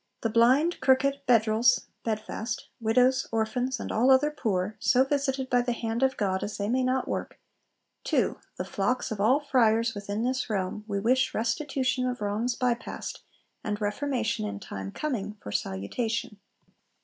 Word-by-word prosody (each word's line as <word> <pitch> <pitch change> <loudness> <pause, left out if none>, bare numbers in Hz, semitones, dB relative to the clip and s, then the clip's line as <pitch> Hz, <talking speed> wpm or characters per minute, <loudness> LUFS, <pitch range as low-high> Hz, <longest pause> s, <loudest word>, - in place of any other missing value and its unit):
The 225 - -1
Blind, 260 +9 +4
Crooked, 275 +1 +3
Bedrels 230 0 +4 0.2
[bedfast], 220 +1 -3
Widows, 250 +4 +3
Orphans, 230 +3 -1
and - - -5
all 240 +4 +3
other 265 +3 +5
Poor, 210 -7 -1
so 255 +1 +4
visited 270 -1 -1
by 245 -1 +3
the 245 0 -1
hand 230 0 -3
of 265 0 +2
God 190 -2 0
as 210 - -4
they 205 0 -2
may 255 +2 +2
not 255 0 0
work, - - -4 0.6
TO - - 0 0.2
The - - -3
Flocks 225 +6 -1
of 210 -2 -3
all 250 +7 +4
Friars 230 -5 +2
within 205 +1 -3
this 255 0 -1
realm, 210 +1 -2
we 200 -2 -1
wish 250 +4 +2
restitution 255 +2 0
of 250 0 -3
wrongs 215 +4 -1
bypast, 245 -2 -2 0.4
and 210 -1 -2
reformation 230 - -1
in 100 -1 -5
time 95 -1 -6
coming, 210 -9 -3
for 105 - -8
salutation. 210 - -3
235 Hz, 160 wpm, -27 LUFS, 210-260 Hz, 0.6 s, other